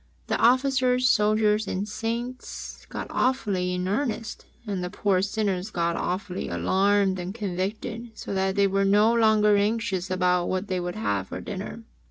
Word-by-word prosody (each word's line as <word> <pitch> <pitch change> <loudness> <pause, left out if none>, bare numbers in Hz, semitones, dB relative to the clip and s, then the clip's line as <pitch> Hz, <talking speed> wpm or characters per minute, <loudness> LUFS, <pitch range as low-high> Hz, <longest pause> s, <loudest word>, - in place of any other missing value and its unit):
The - - 0
Officers, 255 0 +3
Soldiers 210 -1 +3
and 195 +2 -2
saints 235 +4 -5
got - - -5
awfully 205 -8 0
in 180 0 -2
earnest, 230 +1 -2 0.2
and 195 -4 -3
the 180 - -3
poor 190 -1 +1
sinners 200 -1 -1
got 170 -4 -1
awfully 185 0 -3
alarmed 195 0 +2
and 180 +3 -5
convicted 210 +3 -4
so - - -5
that 190 0 0
they 200 - +4
were 195 0 +1
no 210 +3 +4
longer 215 -2 +4
anxious 200 -3 0
about 180 -1 +1
what 185 +2 -2
they 185 -1 0
should 175 0 -4
have 100 -3 -1
for - - -6
dinner. 205 +3 -6
200 Hz, 160 wpm, -26 LUFS, 185-220 Hz, 0.2 s, they